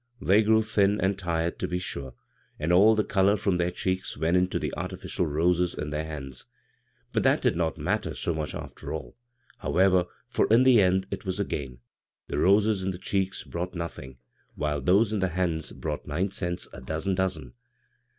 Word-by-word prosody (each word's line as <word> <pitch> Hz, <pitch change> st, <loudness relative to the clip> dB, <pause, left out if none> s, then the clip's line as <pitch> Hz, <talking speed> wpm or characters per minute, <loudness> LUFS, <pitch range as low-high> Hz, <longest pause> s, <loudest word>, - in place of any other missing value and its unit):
They 100 Hz, +1 st, +4 dB
grew 110 Hz, +1 st, +4 dB
thin 105 Hz, -1 st, +2 dB
and 95 Hz, +1 st, +1 dB
tired, 85 Hz, -3 st, -2 dB
to -, -, -1 dB
be 90 Hz, -, -2 dB
sure, 70 Hz, -7 st, -5 dB, 0.4 s
and 80 Hz, +3 st, 0 dB
all 105 Hz, +5 st, +6 dB
the 105 Hz, -, +2 dB
color 100 Hz, +1 st, +3 dB
from 95 Hz, -2 st, 0 dB
their 85 Hz, 0 st, +2 dB
cheeks 95 Hz, +1 st, -2 dB
went 80 Hz, +4 st, +1 dB
into 90 Hz, 0 st, +2 dB
the -, -, -3 dB
artifi 90 Hz, +2 st, -6 dB
cial 90 Hz, -3 st, -1 dB
roses 90 Hz, +3 st, +2 dB
in 75 Hz, -, -4 dB
their 75 Hz, +1 st, -2 dB
hands; 70 Hz, -5 st, -7 dB, 0.7 s
but -, -, +2 dB
that -, -, +3 dB
did -, -, +3 dB
not 85 Hz, -2 st, -1 dB
matter -, -, -1 dB
so 85 Hz, -, -1 dB
much 75 Hz, -3 st, -4 dB
after -, -, -7 dB
all, 80 Hz, -, -6 dB, 0.4 s
however, 95 Hz, -1 st, +3 dB, 0.2 s
for -, -, +1 dB
in 115 Hz, +3 st, +6 dB
the 130 Hz, -4 st, +6 dB
end 95 Hz, 0 st, +2 dB
it -, -, -4 dB
was 95 Hz, -1 st, -3 dB
a 100 Hz, -, +1 dB
gain 65 Hz, -4 st, -5 dB, 0.2 s
— -, -, -67 dB
the 70 Hz, -, -1 dB
roses 100 Hz, +2 st, +4 dB
in 95 Hz, -, -1 dB
the 90 Hz, -, -4 dB
cheeks 95 Hz, 0 st, -2 dB
brought 90 Hz, +2 st, -5 dB
nothing, 70 Hz, -6 st, -6 dB, 0.4 s
while 75 Hz, -1 st, -1 dB
tboee 100 Hz, -, +3 dB
in 105 Hz, -, 0 dB
the 95 Hz, -, +2 dB
hands 85 Hz, -3 st, -1 dB
brought -, -, -5 dB
nine 90 Hz, +6 st, -1 dB
cents 90 Hz, -2 st, -3 dB
a 65 Hz, -, -9 dB
dozen 80 Hz, +8 st, -2 dB
dozen. 90 Hz, -9 st, -2 dB
90 Hz, 200 wpm, -27 LUFS, 80-95 Hz, 0.7 s, all